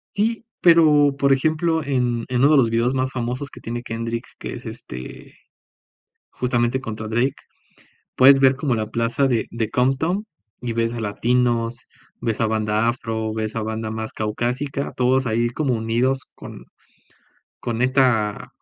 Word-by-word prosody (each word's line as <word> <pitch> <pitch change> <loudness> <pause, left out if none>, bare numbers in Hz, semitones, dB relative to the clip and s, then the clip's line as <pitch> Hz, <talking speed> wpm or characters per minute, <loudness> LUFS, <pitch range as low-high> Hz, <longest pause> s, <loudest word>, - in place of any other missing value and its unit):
Sí, 225 +3 0 0.2
pero, 150 -4 +5
por 140 -1 +4
ejemplo, 160 +3 +1
en 125 -4 0
en 125 0 0
1 140 - +5
de 150 - +6
los 120 -4 +4
videos 115 +3 +1
más 130 0 0
famosos 125 +3 -3
que - - -12
tiene 120 +1 -4
Kendrick, 115 0 -4
que - - -7
es, - - -8
este, 65 +1 -9 1.0
justamente 125 0 0
contra 110 -3 -5
Drake, 120 +4 +1 0.8
puedes 135 +1 +8
ver 135 0 +5
como 135 -3 0
la 110 -1 -1
plaza 115 +4 +1
de 120 -4 0
de 115 -2 -3
Compton 160 - 0 0.3
y 120 -2 -3
ves 115 0 0
a 120 - -4
latinos, 120 +2 0 0.3
ves 115 -2 -2
a - - +3
banda 110 0 +1
afro, 110 -2 -2
ves 110 0 -3
a 110 - -1
banda 110 0 -3
más 110 0 -5
caucásica, 125 +6 -2
todos 130 +1 +2
ahí 115 +1 +1
como 130 +2 -1
unidos 120 +4 0
con - - -11 0.9
con 120 0 -2
esta, 125 -5 +2
120 Hz, 160 wpm, -22 LUFS, 115-135 Hz, 1.0 s, puedes